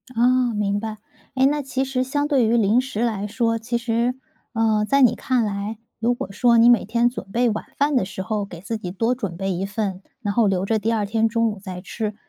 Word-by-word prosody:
哦， 245 +1 +3
明 205 -1 0
白。 220 0 -5 0.4
诶， 260 0 +4
那 295 +2 +2
其 265 -1 -2
实 260 -1 -1
相 290 +3 -1
对 275 -5 +3
于 230 +2 +3
零 225 +2 +3
食 255 -4 -4
来 215 -4 -1
说， 230 +1 0
其 235 +2 -2
实， 235 +1 0 0.4
呃， 220 -2 +2
在 275 +3 +3
你 250 - +5
看 255 -3 0
来， 205 +1 -3 0.2
如 235 +2 +2
果 195 - -6
说 235 +3 +3
你 230 +1 +6
每 240 -3 +5
天 235 +3 +2
准 195 -6 -8
备 240 +3 +2
晚 215 -1 -3
饭 285 0 +2
的 250 - +3
时 190 0 -6
候 215 0 -2
给 175 -4 -10
自 210 +5 -4
己 185 -4 -6
多 225 +6 0
准 200 -9 -5
备 195 +1 -2
一 185 +1 -2
份， 200 -2 -3 0.2
然 205 -4 -2
后 230 -2 +3
留 190 -1 0
着 220 +2 +1
第 220 +2 0
2 215 -2 0
天 225 +2 +1
中 230 0 +1
午 210 - -8
再 185 -2 -7
吃， 215 +2 -4
225 Hz, 255 characters per minute, -22 LUFS, 205-245 Hz, 0.4 s, 你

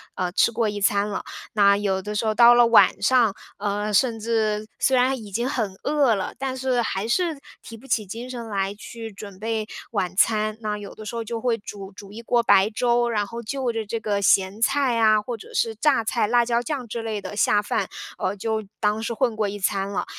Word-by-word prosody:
呃， 180 -1 -2
吃 235 - +3
过 230 -1 0
一 205 0 -5
餐 200 +1 +2
了。 205 - -4 0.3
那 200 -1 +5
有 195 -2 -1
的 210 +2 -5
时 215 - -1
候 215 - +1
到 240 +1 +8
了 240 0 +6
晚 230 -1 +5
上， 240 -5 +4 0.2
呃， 205 +1 -2
甚 230 +1 +2
至 215 -1 -1
虽 265 - +3
然 260 +2 +2
已 215 -4 -10
经 235 +6 -1
很 225 -8 -2
饿 285 -5 +3
了， 190 -2 -4
但 265 -1 -3
是 255 -1 0
还 210 -2 -2
是 325 +4 0 0.2
提 225 - -10
不 255 +5 -16
起 240 -4 0
精 230 +6 -7
神 240 -2 -6
来 195 -1 -1
去 225 +1 -9
准 200 -1 -11
备 220 0 -2 0.3
晚 190 -5 -1
餐， 215 +1 +2
那 210 -1 -2
有 205 -1 -9
的 215 - -10
时 215 - -6
候 230 - -2
就 230 +1 -4
会 240 -2 +1
煮 200 -2 -9
煮 200 0 -12
一 220 +3 -8
锅 240 +1 +2
白 200 -2 +5
粥， 240 +1 +1
然 210 -3 0
后 235 +1 -7
就 255 +2 -2
着 225 -1 -3
这 225 +2 -3
个 205 -2 -1
咸 195 +2 +2
菜 270 +1 +2
呀， 215 -2 +4
或 235 +3 -5
者 205 - -13
是 225 -1 0
榨 265 0 +2
菜、 225 -1 0
辣 240 +1 +3
椒 235 0 +1
酱 255 0 -4
之 230 +1 -4
类 220 -2 -4
的 205 - -7
下 205 0 +3
饭， 205 -2 -1 0.3
呃， 185 +2 -2
就 220 +1 -2 0.2
当 210 0 +1
是 230 +1 -3
混 235 -1 0
过 215 -1 0
一 205 +1 -6
餐 195 0 0
了。 200 - -2
220 Hz, 250 characters per minute, -23 LUFS, 205-235 Hz, 0.3 s, 到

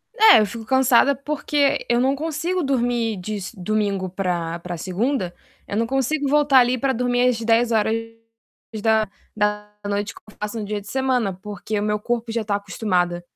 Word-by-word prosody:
É, 435 -3 +8
eu 215 - +3
fico 225 +2 -7
cansada 260 +2 +4
porque 285 0 0
eu 240 0 +3
não 265 +2 +2
consigo 325 +4 -2
dormir 240 -5 0
de 205 +3 -4 0.2
domingo 200 -1 -1
pra 175 -3 -2
pra 175 0 -6
segunda, 190 - -1 0.3
eu 200 - -3
não 230 - +2
consigo 270 +3 0
voltar 290 -1 +5
ali 250 +1 +3
pra 265 +2 0
dormir 245 0 +1
às 245 -2 +1
22:00 220 -2 -2
que - - -14
eu 215 - -18
faço 210 +2 -4
no 210 - -4
dia 205 0 -3
de 200 - -15
semana, 255 -4 0
porque 205 +2 -5
o - - -2
meu 210 0 0
corpo 235 +1 -2
já 225 0 -1
tá 205 -1 -1
acostumado 185 -3 -1
225 Hz, 165 wpm, -22 LUFS, 205-255 Hz, 0.3 s, É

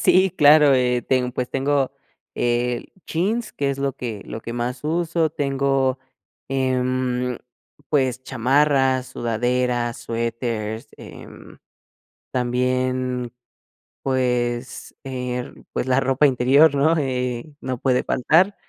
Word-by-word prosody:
Sí, 190 +1 +5
claro, 150 -4 +6
eh, 125 -1 +2
ten 125 -1 +1
pues 125 0 -3
tengo 135 0 0 0.4
el 120 0 -1
jeans, 210 +8 -1
que 140 -1 -1
es 135 - -4
lo 140 0 0
que 115 -6 -5
lo 110 - -7
que 115 - -6
más 120 +1 -3
uso, 165 0 0
tengo, 135 -2 0 0.5
em, 130 -1 0 0.5
pues, 130 -4 +1
chamarras, 130 +1 +2
sudaderas, 120 0 -1
suéteres, 115 -1 -3
eh, - - -11 1.1
también, 125 0 -1 0.7
pues, 125 -2 -1
eh, 125 -2 -4 0.2
pues, - - -2
la 130 +1 +3
ropa 135 +2 +2
interior, 140 +3 +5
¿no? 150 +4 +3
Eh, 125 0 -2
no 130 -1 -3
puede 125 0 +1
faltar, 175 +10 +3
130 Hz, 110 wpm, -22 LUFS, 125-140 Hz, 1.1 s, claro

